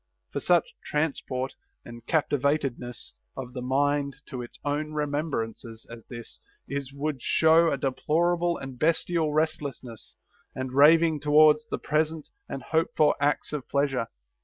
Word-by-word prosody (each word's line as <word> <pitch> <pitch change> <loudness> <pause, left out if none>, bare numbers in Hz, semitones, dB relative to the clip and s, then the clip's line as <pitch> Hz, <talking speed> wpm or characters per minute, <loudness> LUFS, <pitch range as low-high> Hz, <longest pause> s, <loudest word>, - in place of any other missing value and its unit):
For - - -2
such 175 -3 +2
transport 135 -3 -2 0.3
and 120 0 -10
captivatedness 140 - 0 0.2
of 125 -1 -6
the 125 - -5
mind 140 +2 +1
to 130 -4 -5
its 120 - -9
own 150 +1 -1
remembrances 140 -7 -3
as 115 -1 -9
this 120 -2 -9 0.3
is 140 -1 -4
would 140 -1 -3
show 165 +4 +4
a - - 0
deplorable 170 +6 +1
and 135 -2 -8
bestial 165 0 +1
restlessness 150 -7 -3 0.4
and 130 0 -4
raving 160 +3 +6
towards 150 +1 +5
the - - -2
present 155 0 -1 0.2
and 135 -2 -5
hoped 160 +4 0
for 150 -1 +5
acts 145 +1 0
of 145 -4 -4
pleasure. 140 -4 +1
145 Hz, 135 wpm, -27 LUFS, 130-155 Hz, 0.4 s, raving